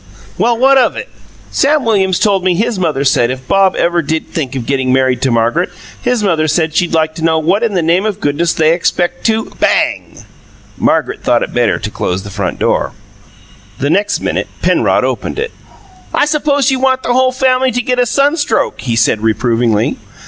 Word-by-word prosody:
"Well, 235 0 +1
what 270 +2 +4
of 250 - +2
it? - - -6 0.4
Sam 285 0 +1
Williams 190 -5 +2
told 195 -3 +1
me 185 -1 +2
his 220 +2 -1
mother 155 -6 0
said 120 -3 +2
if 130 0 -6
Bob 195 -1 +3
ever 170 0 +1
did 160 +1 -2
think 135 -5 -4
of 125 -3 -4
getting 130 -1 0
married 130 -1 +1
to 130 - +1
Margaret, 120 +9 +1 0.3
his 245 -3 0
mother 165 -5 +1
said 160 0 0
she'd 170 0 +1
like 155 -1 +1
to 160 - -7
know 160 -1 +2
what 175 +7 +1
in 225 -4 -1
the 175 - +1
name 175 +6 +1
o' - - +1
goodness 170 -3 -1
they 160 0 +2
expect 175 0 -1
to 220 0 -1
" - - -23
Bang! - - 0 0.6
Margaret - - 0
thought - - +1
it - - -6
better - - +1
to - - -5
close 90 +1 -3
the 100 - -9
front 100 -2 -3
door. - - 0 0.8
The 140 +2 -1
next 205 +2 0
minute - - -2 0.2
Penrod - - +2
opened - - -3
it. 460 +1 -3 0.6
"I - - +3
suppose 290 -2 +1
you 265 - 0
want 260 0 +1
the 245 - 0
whole 255 +1 +3
family 260 0 +1
to 245 0 -1
get 250 +1 -1
a 245 - +2
sunstroke," 285 +5 0
he 120 -3 -2
said 115 -2 +2
reprovingly. 115 0 0
175 Hz, 200 wpm, -14 LUFS, -, 0.8 s, what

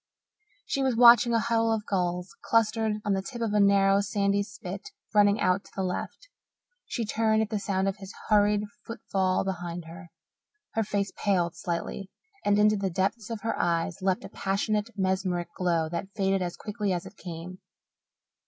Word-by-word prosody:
She 275 - -1
was 260 -3 +1
watching 235 0 +7
a 230 - +3
huddle 225 0 +1
of 220 -1 -1
gulls 180 0 -2
clustered 220 -1 +2
on 205 - +2
the 190 - 0
tip 240 +4 -7
of 225 -3 -1
a 210 - +3
narrow, 200 0 +5
sandy 200 -1 +1
spit 200 -1 -7 0.2
running 205 0 +4
out 185 +2 +2
to - - -17
the 195 - -1
left. 185 - -4 0.6
She 235 - -2
turned 220 0 +2
at 210 - -6
the 215 - 0
sound 195 -1 0
of 195 +1 -1
his 195 -1 -9 0.2
hurried 210 -1 +3 0.2
foot 230 +1 -7
fall 190 -1 +2
behind 175 -2 -4
her. 170 +2 -11 0.6
Her 225 - +1
face 200 -1 -1
paled 180 -5 0
slightly, 180 +2 -4 0.3
and 205 0 +3
into 210 0 +4
the 195 -1 -1
depths 195 +5 -1
of 230 -2 -5
her 225 - -1
eyes 170 +2 0
leapt 190 -1 0
a - - -8
passionate, 205 +3 -1
mesmeric 185 -2 0
glow 170 -3 +1
that 170 +3 -4
faded 195 -2 +1
as 175 -1 -3
quickly 210 -2 -3
as 175 - -3
it - - -11
came. 180 +1 -8
200 Hz, 180 wpm, -27 LUFS, 185-215 Hz, 0.6 s, watching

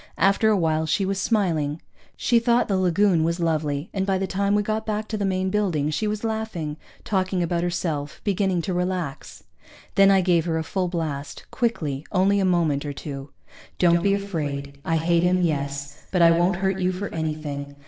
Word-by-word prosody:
After 200 +3 +3
a 215 - +3
while 160 -2 +1
she 195 +5 +1
was 195 0 -1
smiling. 165 -10 0 0.4
She 240 -2 +3
thought 235 +1 +2
the 195 - +1
lagoon 185 -1 +3
was 170 +2 0
lovely, 155 -2 -1
and 195 - 0
by 195 -1 +1
the 195 - -1
time 200 +2 0
we 205 - +2
got 215 +1 -1
back 215 0 -3
to 220 - -2
the 205 -2 -1
main 185 0 0
building 175 -8 0
she 215 +8 -1
was 210 +1 -3
laughing, 220 -9 -3 0.3
talking 190 -3 0
about 170 0 0
herself, 160 -5 -2
beginning 190 -3 0
to 185 - -2
relax. 180 -5 -3 0.5
Then 195 0 +6
I 195 -1 +5
gave 175 -3 +2
her 165 -2 0
a 160 - -1
full 185 +2 -1
blast, 155 -5 -4
quickly, 155 - -1
only 200 +2 +3
a 195 - +2
moment 165 -6 +1
or 145 -1 -4
two. 140 -1 -7 0.5
_Don't 170 -1 +4
be 200 +2 +3
afraid 145 -8 -4
I 165 - 0
hate 170 +1 +2
him, 180 +1 +2
yes, 140 -2 -3
but 180 -2 +3
I 165 - +7
won't 175 +2 +3
hurt 190 +1 -1
you 185 0 +1
for 190 +2 -4
anything. 150 -3 -4
180 Hz, 200 wpm, -24 LUFS, 155-195 Hz, 0.5 s, I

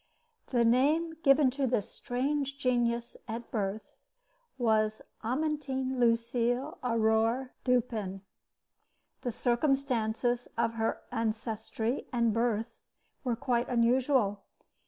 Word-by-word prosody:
The 240 -3 +2
name 295 +8 +3
given 275 -2 +5
to 270 +1 0
this 230 -5 -1
strange 275 +2 -2
genius 240 -3 0
at 230 +1 -6
birth 205 -1 -3 0.7
was 215 -3 +1 0.2
Amantine 265 0 -1
Lucile 240 +3 +1
Aurore 230 +2 +2
Dupin. 225 -6 0 1.0
The 245 - -2
circumstances 245 -2 0
of 230 0 +1
her 225 0 -1
ancestry 225 +1 -2
and 235 -3 +2
birth 230 0 -1 0.4
were 245 -3 0
quite 240 0 0
unusual. 240 -3 +2
240 Hz, 95 wpm, -30 LUFS, 225-260 Hz, 1.0 s, given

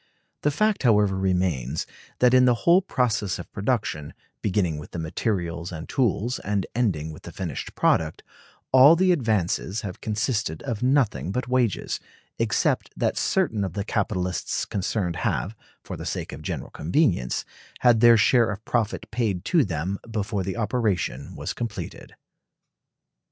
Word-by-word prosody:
The 150 - +2
fact, 215 +8 +1
however, 105 -6 +4
remains, 90 -8 0 0.3
that 125 0 +4
in 130 0 +6
the 125 -1 +4
whole 175 +2 +6
process 115 - 0
of - - -9
production, 100 - -2 0.3
beginning 90 -6 0
with 75 - -11
the - - -4
materials 85 0 -2
and 80 -2 -7
tools 120 -2 0
and 100 -2 -1
ending 90 -10 0
with 75 - -12
the 85 - -9
finished 85 -4 -5
product, 80 -1 +1 0.5
all 130 +5 +8
the 185 +2 +3
advances 110 - 0
have 95 -3 -7
consisted 110 -5 -1
of 115 -7 -3
nothing 125 - +2
but 125 +5 -2
wages, 125 -6 0 0.4
except - - +1
that - - +1
certain 105 -2 +1
of 95 -4 -3
the 100 +1 -2
capitalists 95 -5 -1
concerned 95 -3 -2
have, 95 +5 -1 0.3
for - - -6
the - - -7
sake - - -3
of - - -8
general - - -5
convenience, 85 - 0 0.4
had 120 -3 +5
their 120 0 +7
share 115 +1 +4
of 105 +1 -5
profit 115 -3 -1
paid 110 -6 -1
to 170 -4 +4
them 90 +1 -3
before 105 -2 -2
the 95 +3 -3
operation 110 -4 -1
was - - -4
completed. 115 -4 -6
105 Hz, 150 wpm, -25 LUFS, 90-120 Hz, 0.5 s, all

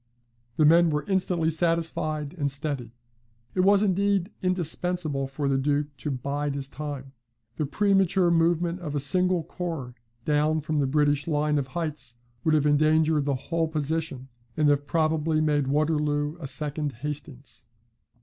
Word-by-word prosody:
The 155 - +3
men 170 +2 +6
were 150 -1 -1
instantly 180 -4 +1
satisfied 160 -2 0
and 145 -5 -1
steady. 135 -4 -5 0.6
It - - -3
was, 200 +2 +5
indeed, 200 0 +1
indispensable 175 -5 -1
for 140 +1 -3
the 135 -1 +1
Duke 145 +1 -1
to 150 - -4
bide 140 +2 -2
his 140 -1 -3
time. 140 -2 -6 0.5
The 150 - -1
premature 195 -1 +2
movement 170 +1 +2
of 150 -5 -5
a - - +1
single 180 +4 +2
corps 160 -8 -5 0.3
down 155 +1 +2
from 155 0 -1
the 140 - +1
British 145 +1 +1
line 150 -1 +1
of 135 - -3
heights, 150 -8 -4 0.3
would 155 -1 +3
have 150 -1 +2
endangered 155 0 +3
the 140 -1 +1
whole 165 +5 -1
position, 155 -3 -3 0.3
and 150 -1 +4
have 145 0 +1
probably 155 -1 +1
made 150 -3 +1
Waterloo 150 0 0
a 150 - -5
second 150 0 -2
Hastings. 140 -4 -7
150 Hz, 150 wpm, -26 LUFS, 145-165 Hz, 0.6 s, men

